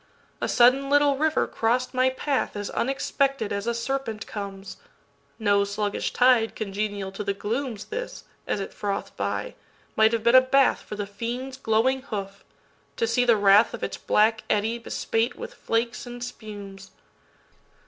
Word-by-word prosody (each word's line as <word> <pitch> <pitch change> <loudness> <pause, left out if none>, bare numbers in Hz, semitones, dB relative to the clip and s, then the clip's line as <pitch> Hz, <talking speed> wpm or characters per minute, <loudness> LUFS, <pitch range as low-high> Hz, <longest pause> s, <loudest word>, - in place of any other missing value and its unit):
A - - -1
sudden 255 +3 +4
little 290 0 +4
river 315 +3 +1
cross'd 245 +3 0
my 255 0 +3
pathAs 260 -6 -2
unexpected 270 -2 0
as 200 +2 -3
a 235 - +1
serpent 235 -2 -3
comes.No 195 -2 -4
sluggish 205 0 -2
tide 245 -3 +3
congenial 205 -1 -3
to 195 +2 -5
the 200 -1 -2
glooms; 225 +1 -3
This, - - -6 0.2
as - - -1
it 195 - -5
froth'd 200 -1 -4
by, - - -3 0.4
might 220 0 +5
have 230 -2 -1
been 235 +1 +4
a 255 - +9
bathFor 260 -5 +2
the 205 - -2
fiend's 235 +6 -5
glowing 260 +2 +1
hoof—to 205 - -7
see 245 - +2
the 235 -2 +5
wrathOf 205 +3 +4
its - - -3
black 220 +1 +2
eddy 220 +3 +1
bespate 225 0 -1
with - - -8
flakes 235 +2 -2
and 245 0 -7
spumes. 205 -5 -9
225 Hz, 145 wpm, -25 LUFS, 205-255 Hz, 0.4 s, a